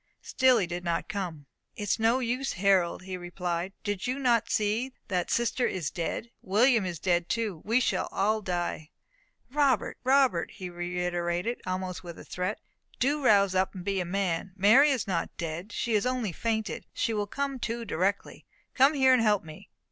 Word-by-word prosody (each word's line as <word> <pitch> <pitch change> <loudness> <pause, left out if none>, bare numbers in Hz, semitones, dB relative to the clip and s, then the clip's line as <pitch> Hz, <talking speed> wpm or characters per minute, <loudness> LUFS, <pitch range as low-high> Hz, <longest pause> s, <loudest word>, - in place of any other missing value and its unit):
Still 260 -2 +4
he 200 - +1
did 175 +1 -5
not 170 -1 -1
come. 180 -8 -4 0.3
"It 210 - -5
is 205 - 0
no 225 +3 +3
use, 255 +2 -1
Harold," 185 -2 +2
he 185 0 -5
replied. 175 0 -3
"Do 205 -1 -1
you 250 +5 -2
not 240 -4 +2
see 220 +5 0 0.2
that 180 -3 -1
sister 240 +1 +1
is 175 -7 -3
dead? 200 +7 -4
William 220 +1 +3
is 175 -2 -4
dead 175 +1 0
too! 215 -8 -2
We 230 +4 +2
shall 255 - 0
all 215 +2 +1
die!" 175 -4 -3 0.6
"Robert! 280 -2 +1
Robert!" 260 -10 +3
he 180 -1 -7
reiterated, 175 +4 -2
almost 185 0 -3
with 170 -1 -8
a - - -11
threat, 185 +4 -3 0.4
"do 285 +3 +1
rouse 200 -5 +5
up 190 +1 +1
and 180 -1 -7
be 195 -1 0
a - - 0
man. 185 0 -2
Mary 220 +10 +6
is 265 -6 0
not 180 -4 -1
dead, 170 +5 -5
she 230 +2 -2
has 215 +3 +2
only 250 -6 -1
fainted; 220 -1 -2
she 230 - 0
will 205 -1 -1
come 275 +3 -3
to 235 0 -3
directly. 195 +2 -2 0.3
Come 270 +4 +5
here 265 -2 +5
and 255 - +4
help 210 -3 +3
me." 155 -1 -12
200 Hz, 185 wpm, -28 LUFS, 180-235 Hz, 0.6 s, Mary